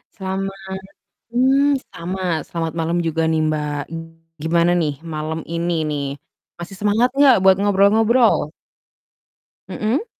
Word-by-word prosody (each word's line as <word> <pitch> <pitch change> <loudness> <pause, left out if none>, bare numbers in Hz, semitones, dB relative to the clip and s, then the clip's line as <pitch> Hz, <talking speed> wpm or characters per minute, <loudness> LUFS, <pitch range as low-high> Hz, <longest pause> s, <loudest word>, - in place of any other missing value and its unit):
Selamat 195 0 -4 0.8
mmm, 270 +3 +3 0.2
sama, 185 +3 -5 0.3
selamat 165 -1 -3
malam 165 +2 0
juga 165 0 -1
nih, 160 - +1
Mbak. 150 -1 -2 0.7
Gimana 170 +2 +2
nih 155 -3 0 0.2
malam 155 +1 -3
ini 170 +1 -1 0.2
nih, 145 -1 -2 0.6
masih 175 +3 -8
semangat 210 +4 +2
enggak 280 -2 +6
buat 190 -1 +6
ngobrol-ngobrol? 205 - +3 1.2
Mhm. 230 - -1
190 Hz, 110 wpm, -20 LUFS, 165-220 Hz, 1.2 s, enggak